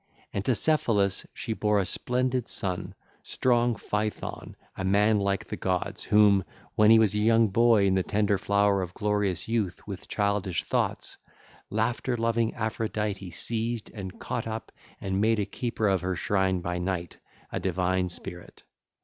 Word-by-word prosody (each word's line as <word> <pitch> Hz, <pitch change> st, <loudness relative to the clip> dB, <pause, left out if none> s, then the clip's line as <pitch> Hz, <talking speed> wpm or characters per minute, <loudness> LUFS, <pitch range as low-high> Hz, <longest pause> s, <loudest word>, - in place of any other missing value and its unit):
And 100 Hz, -, -2 dB
to 130 Hz, -, +2 dB
Cephalus 105 Hz, -10 st, +2 dB
she 115 Hz, -, -4 dB
bare 105 Hz, -1 st, +1 dB
a 100 Hz, -, +2 dB
splendid 125 Hz, +4 st, -1 dB
son, 90 Hz, -2 st, -1 dB, 0.3 s
strong 120 Hz, -1 st, +1 dB
Phaethon, 105 Hz, 0 st, -4 dB, 0.2 s
a -, -, -4 dB
man 105 Hz, +3 st, +3 dB
like 100 Hz, 0 st, 0 dB
the -, -, -5 dB
gods, 90 Hz, -1 st, -2 dB
whom, 105 Hz, -2 st, +5 dB, 0.3 s
when 105 Hz, 0 st, +5 dB
he 115 Hz, -, +8 dB
was 110 Hz, -3 st, +4 dB
a 105 Hz, -, 0 dB
young 115 Hz, 0 st, +4 dB
boy 115 Hz, 0 st, +4 dB
in 95 Hz, -, +3 dB
the 95 Hz, -, +2 dB
tender 100 Hz, +1 st, +1 dB
flower 100 Hz, -1 st, +2 dB
of 90 Hz, -1 st, -6 dB
glorious 105 Hz, -3 st, -1 dB
youth 110 Hz, -6 st, -1 dB
with 100 Hz, -2 st, -7 dB
childish 100 Hz, -, 0 dB
thoughts, -, -, -2 dB, 0.5 s
laughter 120 Hz, +3 st, -1 dB
loving 115 Hz, 0 st, 0 dB
Aphrodite 105 Hz, -3 st, -2 dB
seized 115 Hz, +5 st, -3 dB
and 95 Hz, -4 st, -7 dB
caught 115 Hz, -2 st, -3 dB
up 110 Hz, 0 st, -5 dB, 0.3 s
and 95 Hz, 0 st, -1 dB
made 110 Hz, +1 st, +3 dB
a 105 Hz, -, 0 dB
keeper 115 Hz, -2 st, -2 dB
of 95 Hz, -2 st, +2 dB
her 90 Hz, 0 st, -1 dB
shrine 95 Hz, +1 st, +1 dB
by 90 Hz, +1 st, -3 dB
night, 90 Hz, -1 st, -3 dB, 0.3 s
a -, -, -2 dB
divine 90 Hz, 0 st, 0 dB
spirit. 90 Hz, 0 st, -9 dB
105 Hz, 160 wpm, -27 LUFS, 95-115 Hz, 0.5 s, he